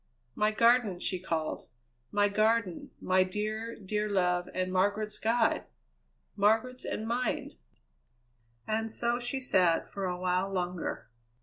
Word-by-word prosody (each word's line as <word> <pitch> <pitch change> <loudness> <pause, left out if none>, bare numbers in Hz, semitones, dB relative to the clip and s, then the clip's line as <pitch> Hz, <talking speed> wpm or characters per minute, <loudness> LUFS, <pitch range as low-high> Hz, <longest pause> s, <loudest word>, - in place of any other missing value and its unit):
"My 210 +7 +2
Garden!" 225 -3 +3
she 185 0 -2
called; 165 -3 -3 0.4
"my 205 0 +3
Garden, 215 -2 +1
my 185 0 +3
dear, 215 +4 -3
dear 210 +1 -2
love 180 -2 +1
and 185 0 -2
Margaret's 205 +3 0
God! 225 +1 +1 0.7
Margaret's 225 +5 +1
and 220 - -3
mine!" 245 +2 -1 1.1
And 225 +1 -1
so 235 +2 +2
she 245 +2 -1
sat 185 -9 +2
for 195 -1 -3
a 180 -1 -2
while 185 +1 0
longer. 180 -7 -3
205 Hz, 125 wpm, -30 LUFS, 185-225 Hz, 1.1 s, Garden